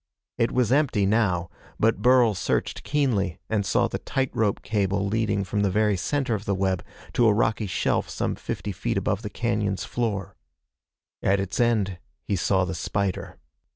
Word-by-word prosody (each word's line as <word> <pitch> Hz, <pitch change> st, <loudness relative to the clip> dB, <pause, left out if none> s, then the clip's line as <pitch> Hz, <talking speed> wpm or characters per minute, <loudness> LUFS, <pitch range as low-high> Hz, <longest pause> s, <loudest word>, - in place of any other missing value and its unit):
It 115 Hz, -, +2 dB
was 125 Hz, -2 st, +1 dB
empty 130 Hz, -8 st, +3 dB
now, 95 Hz, -5 st, +1 dB, 0.3 s
but 115 Hz, +1 st, +2 dB
Burl 125 Hz, -3 st, +5 dB
searched 95 Hz, -, -1 dB
keenly 125 Hz, -, 0 dB
and 105 Hz, -2 st, +2 dB
saw -, -, +2 dB
the -, -, -4 dB
tight 135 Hz, -1 st, -1 dB
rope 105 Hz, -3 st, 0 dB
cable 100 Hz, -2 st, 0 dB
leading 105 Hz, -1 st, 0 dB
from 105 Hz, +2 st, -2 dB
the 100 Hz, -, +2 dB
very 105 Hz, +1 st, +2 dB
center 130 Hz, +6 st, -1 dB
of 105 Hz, -1 st, -3 dB
the 100 Hz, -, 0 dB
web 95 Hz, -1 st, 0 dB, 0.3 s
to 120 Hz, -, +4 dB
a 105 Hz, -, +5 dB
rocky 110 Hz, -1 st, +1 dB
shelf -, -, 0 dB
some -, -, -1 dB
fifty -, -, -4 dB
feet -, -, -2 dB
above 100 Hz, -, 0 dB
the 105 Hz, -, -5 dB
cañon's 105 Hz, -3 st, -1 dB
floor. 105 Hz, -6 st, -2 dB, 0.9 s
At 100 Hz, +1 st, +2 dB
its 95 Hz, 0 st, -3 dB
end 105 Hz, -6 st, +1 dB, 0.2 s
he 100 Hz, -, -1 dB
saw 95 Hz, 0 st, +2 dB
the 95 Hz, -, -3 dB
spider. 95 Hz, +1 st, -2 dB
105 Hz, 175 wpm, -25 LUFS, 95-115 Hz, 0.9 s, Burl